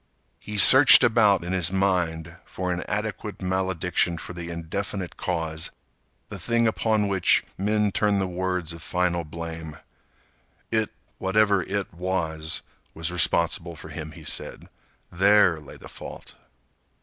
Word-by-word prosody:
He 105 0 -7
searched 130 +5 +9
about 105 -6 +3
in 90 +2 -4
his 90 -2 +2
mind 85 -4 -1
for 90 -1 -4
an 90 - -4
adequate 105 0 -4
malediction 90 -2 -1
for 90 - -9
the 85 -1 -7
indefinite 90 +3 -5
cause, 80 -3 -3 0.6
the - - -8
thing 115 0 +1
upon 110 -1 +1
which 95 -3 +2
men 105 +1 0
turn 105 0 +1
the 95 - 0
words 90 -2 -3
of 85 - -11
final 90 0 -1
blame. 80 0 -8 0.9
It—whatever 100 0 0
it - - -4
was—was 80 -2 -4
responsible 85 0 +1
for 80 - -11
him, 80 0 -7
he - - -13
said. - - -6 0.4
There 95 -2 +4
lay 75 - -13
the - - -13
fault. - - -11
90 Hz, 130 wpm, -24 LUFS, 85-100 Hz, 0.9 s, searched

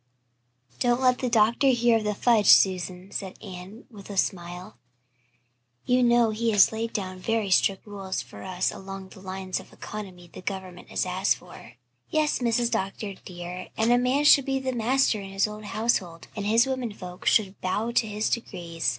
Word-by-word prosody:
"Don't 240 0 +2
let 255 -1 +3
the 250 - -1
doctor 230 +4 +3
hear 240 -3 +4
of 215 - -6
the 210 0 0
fudge, 220 -2 +3
Susan," 185 0 +4
said 190 -1 -5
Anne, 190 +3 -10
with 205 -3 -12
a 200 - -6
smile. 175 -7 -3 1.1
"You 250 +1 +3
know 240 -2 +4
he 230 +2 -1
has 200 -2 +6
laid 225 +1 -3
down 185 -2 -4
very 220 0 -1
strict 190 +1 +2
rules 195 -2 -5
for - - -9
us 185 -1 -1
along 195 0 -8
the - - -14
lines 190 0 -4
of - - -14
economy 185 -4 -8
the - - -11
government 185 -2 -6
has - - -1
asked 185 +2 +1
for." - - -14 0.4
"Yes, 305 -1 +1
Mrs. 235 -1 +1
Dr. 195 +1 -2
dear, 180 -1 -8
and 225 +2 +2
a 245 - +5
man 255 +4 +1
should 290 -2 +7
be 270 -1 0
master 240 -2 +1
in 195 - -8
his 195 +2 +1
own 210 0 -8
household, 200 -7 -1
and 205 -2 -3
his 230 +2 +4
women 260 -3 -2
folk 180 -2 -9
should 200 -3 +2
bow 210 +5 -1
to 235 -1 +2
his 210 +1 -1
decrees. 175 -7 -2
205 Hz, 185 wpm, -26 LUFS, 185-235 Hz, 1.1 s, should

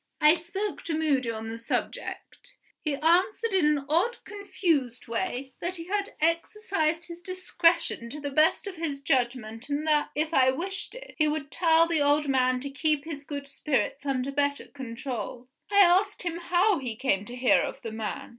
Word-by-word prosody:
I 300 0 +7
spoke 385 +4 -4
to 320 -2 -1
Moody 280 -6 +1
on 225 0 -4
the 230 - -5
subject. 365 - -4 0.3
He 300 -3 0
answered 365 +8 +2
in 365 -6 +4
an 295 -2 +1
odd, 355 +11 +2
confused 330 - -1
way, 245 +4 -3
that 360 +2 -3
he 335 - -5
had 405 0 -1
exercised 335 0 0
his 340 0 -9
discretion 345 -8 +1
to 295 - -7
the 285 -1 -4
best 310 +8 +3
of 390 -3 -6
his 310 -4 -3
judgment 240 -3 -1
and 290 +2 -1
that 300 -1 +2
(if 310 +2 -1
I 260 -3 +5
wished 370 - -4
it), - - -10
he 305 - +4
would 300 -2 -2
tell 330 +1 +4
the 330 -3 +1
old 290 +1 +3
man 255 -1 +2
to 280 +1 -5
keep 300 0 0
his 295 -3 -6
good 285 -1 -6
spirits 280 0 -1
under 270 -1 -1
better 285 0 0
control. 250 -2 -6 0.2
I 405 -1 +6
asked 385 +3 +4
him 345 -1 -2
how 355 +2 +2
he 245 -4 -4
came 210 -5 0
to 240 - -7
hear 250 0 +4
of - - -4
the 225 - -4
man. 220 +5 -5
300 Hz, 185 wpm, -27 LUFS, 265-345 Hz, 0.3 s, I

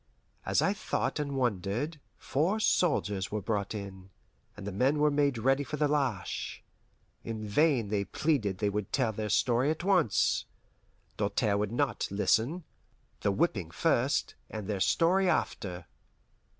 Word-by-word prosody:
As - - +3
I - - +2
thought - - -2
and 140 -2 -2
wondered, 120 - -1 0.2
four 175 +10 0
soldiers 100 - +1
were 105 - -1
brought 100 +1 -2
in, 95 -2 -8 0.5
and 100 - -8
the 100 - -3
men 130 +10 +2
were 150 0 +3
made 145 -3 +2
ready 135 +5 +2
for 150 - -5
the 150 0 +2
lash. 135 -10 -2 0.6
In 110 -2 -5
vain 125 -1 +2
they 100 -1 0
pleaded 115 - 0
they 105 - 0
would 105 0 -3
tell 110 - +1
their 105 0 -3
story 120 +5 +2
at 160 +2 -2
once. 180 - +2 0.7
Doltaire 105 0 +1
would 105 0 -1
not 140 +3 0
listen; 115 - +1 0.6
the 100 - +1
whipping 100 - 0
first, 80 - +1 0.2
and 110 -2 -6
their 105 -2 -2
story 180 - +3
after. 90 - -2
115 Hz, 150 wpm, -30 LUFS, 100-150 Hz, 0.7 s, As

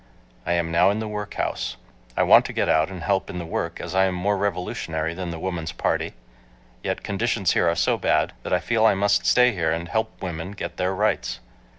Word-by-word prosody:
I - - +2
am 85 -1 0
now 85 +3 +5
in 100 - 0
the 110 0 -3
workhouse. 105 -1 -3 0.4
I - - +4
want - - +7
to - - -5
get - - 0
out 80 +2 +3
and 90 -3 -7
help 95 +4 0
in 95 - -5
the 85 - -4
work 80 - -3
as - - -6
I 95 0 +4
am 95 -1 -1
more 100 +3 +1
revolutionary 85 -4 -2
than 90 0 -5
the 85 - -5
Woman's 85 -2 -3
Party, - - -1 0.7
yet - - -3
conditions 100 -2 0
here 85 - +3
are 85 - +1
so 90 - +2
bad - - +1
that - - -6
I - - +3
feel 115 -2 +1
I 110 -3 +5
must 100 +1 +2
stay 125 0 +5
here 85 -7 0
and 85 +1 -2
help 110 +6 -2
women 90 +1 -5
get 100 - -6
their 95 +1 0
rights. 105 - 0
95 Hz, 225 wpm, -24 LUFS, 85-100 Hz, 0.7 s, want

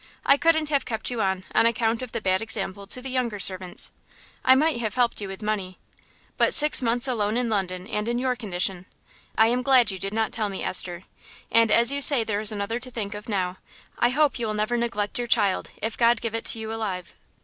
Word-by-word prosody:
I 275 - +6
couldn't 315 0 +1
have 285 -2 +1
kept 225 0 -4
you 235 -3 -3
on, 190 -1 -1
on 230 - +4
account 230 0 -1
of 255 -3 -7
the 230 - -4
bad 190 0 0
example 200 -3 -2
to 250 +4 -2
the 265 - -6
younger 240 -5 -2
servants. 185 -1 +2 0.5
I 260 - +6
might 300 -1 +1
have 220 -2 -3
helped 245 -3 0
you 200 - -5
with 195 +2 -9
money. 200 -4 -3 0.6
But - - +3
six 300 -1 +5
months 240 +2 0
alone 220 -3 -1
in 245 -1 -1
London 185 -4 -3
and 210 0 -3
in 240 0 -1
your 255 0 -1
condition! 185 -4 -3 0.5
...I 220 - +5
am 245 +2 +1
glad 255 -5 +3
you 190 - -7
did 195 +2 -4
not 220 +1 -1
tell 215 -2 -2
me, 195 - -6
Esther; 180 -1 0 0.5
and 230 -1 +4
as 235 +3 +6
you 280 0 -2
say 275 -4 +7
there 210 -2 -2
is 215 0 +3
another 210 +3 -3
to 255 +1 -8
think 220 -4 -5
of 210 +2 -9
now, 185 -3 -2 0.4
I 240 - +3
hope 290 +1 +1
you 230 - -2
will 215 - -3
never 215 +3 -1
neglect 235 -3 -2
your 240 - -3
child, 200 -4 +1
if 225 +1 -3
God 235 -1 +3
give 230 0 -4
it 225 - -4
to - - +2
you 220 0 -6
alive." 190 -5 -5
225 Hz, 235 wpm, -24 LUFS, 200-245 Hz, 0.6 s, say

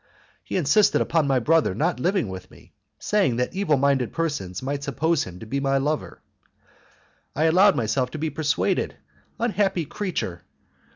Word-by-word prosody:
He - - -3
insisted 185 +5 +3
upon 165 -3 +1
my 135 -1 +2
brother 150 - +2
not 115 - 0
living 180 - +1
with 95 0 -8
me, - - -19 0.2
saying 200 - +1
that 125 +1 -1
evil 185 -7 +1
minded 135 -3 +1
persons 130 - -3
might 140 +1 -3
suppose 155 +3 0
him 90 -1 -9
to - - -7
be 135 +6 -2
my 135 0 +1
lover. 150 +3 -3 1.1
I 150 - +1
allowed 185 +5 +5
myself 125 +3 0
to 155 - -7
be 155 0 -2
persuaded. 150 +1 0 0.4
Unhappy 200 -7 0
creature! 175 - -4
145 Hz, 160 wpm, -24 LUFS, 125-170 Hz, 1.1 s, allowed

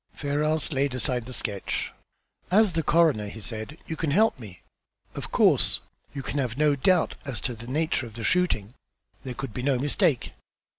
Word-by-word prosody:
Ferrars 150 +2 0
laid 135 -1 0
aside 125 -1 -1
the - - -7
sketch. 105 -5 -2 0.6
"As 205 0 +4
the 165 - +1
coroner," 155 -10 +3
he 110 - -8
said, 110 +6 -6
"you 160 - -4
can 160 -1 -1
help 210 +1 +3
me. 100 -6 -11 0.5
Of - - -5
course, - - +4 0.3
you 140 -2 -6
can 145 - -2
have 125 -3 -2
no 150 -1 +4
doubt 175 +5 +3
as 135 -5 -3
to 125 - -2
the 115 +1 -9
nature 145 -2 0
of 110 - -13
the 115 - -6
shooting. 150 - +1 0.5
There 125 -2 -5
could 120 -2 -5
be 125 - -4
no 135 0 +2
mistake." 140 0 +1
135 Hz, 185 wpm, -26 LUFS, 120-155 Hz, 0.6 s, As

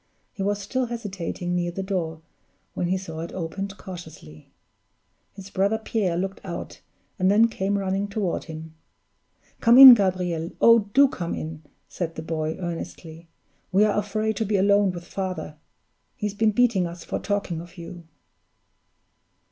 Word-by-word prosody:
He - - -7
was 205 +1 0
still 250 +5 -2
hesitating 195 -6 -4
near 175 0 0
the 190 +2 -4
door, 170 -5 -3 0.5
when 175 - -2
he 185 +2 +1
saw 165 -4 -7
it 165 +1 -5
opened 195 +3 -5
cautiously. 160 - -11 0.9
His 195 -1 -11
brother 200 +3 +1
Pierre 210 -6 -1
looked 195 +2 -3
out, 175 -3 -7 0.4
and 185 0 +3
then 215 +3 +5
came 200 -2 -1
running 195 +1 -1
toward 200 -3 -2
him. 160 -1 -9 0.9
"Come 235 +2 +5
in, 265 -1 +13
Gabriel; 180 -5 0
oh, 230 -3 +5
do 280 +1 +7
come 175 -9 -4
in!" 155 0 -6 0.3
said 165 -2 -5
the 160 - -6
boy, 160 -1 -2
earnestly. 165 -1 -7 0.4
"We 195 +2 +4
are 210 - +1
afraid 215 +1 -1
to 225 - 0
be 205 0 +1
alone 200 +1 +4
with 175 -1 -8
father. 185 -5 -5 0.6
He's 210 -4 -3
been 215 +1 +2
beating 220 -6 +2
us 170 0 -9
for - - -4
talking 200 -5 -2
of 175 +2 -14
you." 170 0 -10
190 Hz, 155 wpm, -24 LUFS, 170-205 Hz, 0.9 s, in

